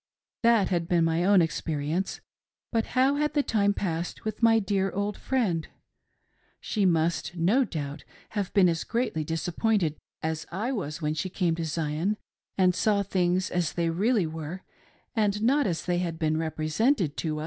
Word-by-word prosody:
That 230 -4 +4
had 170 -2 0
been 170 -2 +3
my 165 +1 +1
own 195 -1 +5
ex 160 - -2
perience; 160 +4 -2 0.5
but 230 +2 -1
how 270 +2 +4
had 300 +1 0
the 290 - +3
time 205 -5 +2
passed 175 -3 -3
with 215 +1 -4
my 225 -1 +6
dear 195 -2 +1
old 200 +2 -2
friend? 200 -12 -1 0.9
She 205 -3 0
must, 170 +1 +1
no 190 +11 +3
doubt, 145 - -5 0.3
have 205 -3 -3
been 195 -3 +5
as 165 -2 0
greatly 230 -10 -1
disappointed 165 +2 0 0.3
as 160 0 -2
I 215 +8 -2
was 170 - -4
when 150 0 +1
she 170 +4 -3
came 175 -2 0
to 165 0 -3
Zion 160 +5 -1 0.4
and 185 -1 +4
saw 200 +2 +2
things 185 -1 0
as 175 -4 0
they 170 -1 0
really 205 +3 +2
were, 160 +3 -6 0.5
and 210 -2 +1
not 275 +2 +3
as 170 -3 -2
they 175 -1 +1
bad 170 -2 -2
been 155 -1 +1
represented 160 - 0
to 155 -2 -2
us. - - -3
180 Hz, 175 wpm, -27 LUFS, 160-210 Hz, 0.9 s, my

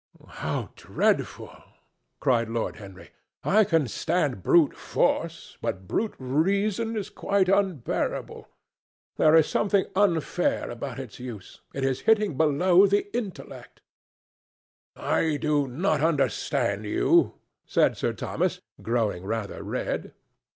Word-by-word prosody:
"How - - -4
dreadful!" - - -1 0.6
cried 115 -3 +1
Lord 115 0 -2
Henry. 95 -3 -12 0.3
"I 215 +2 +4
can 165 -7 +1
stand 135 - -1
brute 160 - +4
force, - - -1
but 95 -1 -4
brute 220 - -1
reason 200 - 0
is 205 0 -4
quite 200 -2 +1
unbearable. 190 -9 -1 0.7
There 155 0 +5
is 160 -2 +6
something 200 -1 +1
unfair 180 -6 +1
about - - -6
its - - -8
use. 120 -6 -9
It 135 - -4
is 135 -1 0
hitting 210 -7 +3
below 175 +6 +4
the 205 +2 0
intellect." 215 -6 -7 1.1
"I 155 -2 0
do 145 -2 +1
not 155 +3 0
understand 135 -7 0
you," 105 - +3 0.3
said - - +3
Sir - - -1
Thomas, - - -2 0.2
growing 110 -6 -1
rather 105 0 -4
red. - - -4
155 Hz, 115 wpm, -26 LUFS, 125-195 Hz, 1.1 s, is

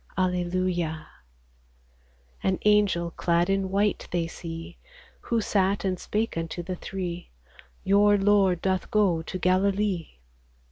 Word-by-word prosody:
Alleluia! 180 -3 -1 1.4
An 190 -1 +1
angel 205 -5 +3
clad 170 +2 +1
in 195 -1 0
white 200 +1 0
they 175 -1 0
see, 165 +1 -8 0.4
Who 230 -1 -1
sat 200 -1 +1
and 185 -2 -1
spake 220 +2 -2
unto 165 +1 -4
the 185 +1 -4
three, 180 -1 -5 0.2
— - - -22
" - - -34
Your 205 +1 +4
Lord 195 -3 +3
doth 190 -1 0
go 195 -6 +2
to 185 - -5
Galilee." 190 0 +1
185 Hz, 130 wpm, -26 LUFS, 170-200 Hz, 1.4 s, Your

